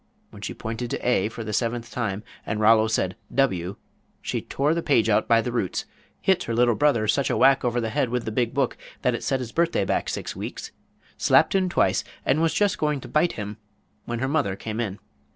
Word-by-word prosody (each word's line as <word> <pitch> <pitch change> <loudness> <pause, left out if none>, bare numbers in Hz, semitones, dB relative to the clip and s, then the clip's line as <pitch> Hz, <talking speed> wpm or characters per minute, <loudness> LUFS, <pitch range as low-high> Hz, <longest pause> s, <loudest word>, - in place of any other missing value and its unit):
When - - -12
she - - -5
pointed 115 +2 -4
to - - -3
"A" 110 -4 +2
for 115 0 -7
the 105 -1 -5
seventh 115 +1 -1
time, 105 -4 -2 0.2
and 105 - -3
Rollo 110 0 +5
said 95 -4 0 0.2
"W," 95 -9 +1 0.4
she - - -3
tore 145 +3 0
the 170 - -1
page 115 -8 +2
out 105 0 +2
by 115 0 +5
the 125 - -3
roots, 110 -7 -2 0.3
hit 190 -2 +2
her 115 - -2
little 120 0 +4
brother 120 -4 +2
such 140 +5 +2
a - - +1
whack 135 0 +5
over 120 -1 +1
the 115 -2 -2
head 140 -2 +1
with 125 0 -2
the 110 - -3
big 120 +1 0
book 135 -2 0 0.3
that 125 - +3
it 120 - -4
set 135 - 0
his 120 -3 -5
birthday 170 +3 +1
back - - 0
six - - -4
weeks, - - -6 0.5
slapped - - +4
him 190 -1 +2
twice, - - +2 0.2
and 145 +4 +2
was 165 -1 +3
just 205 -2 +2
going 150 -2 0
to - - -9
bite 160 +3 +2
him, 105 0 -6 0.5
when 120 - -3
her 130 +3 -1
mother 135 -10 0
came 110 +2 -5
in. 105 -4 -2
120 Hz, 225 wpm, -25 LUFS, 110-140 Hz, 0.5 s, Rollo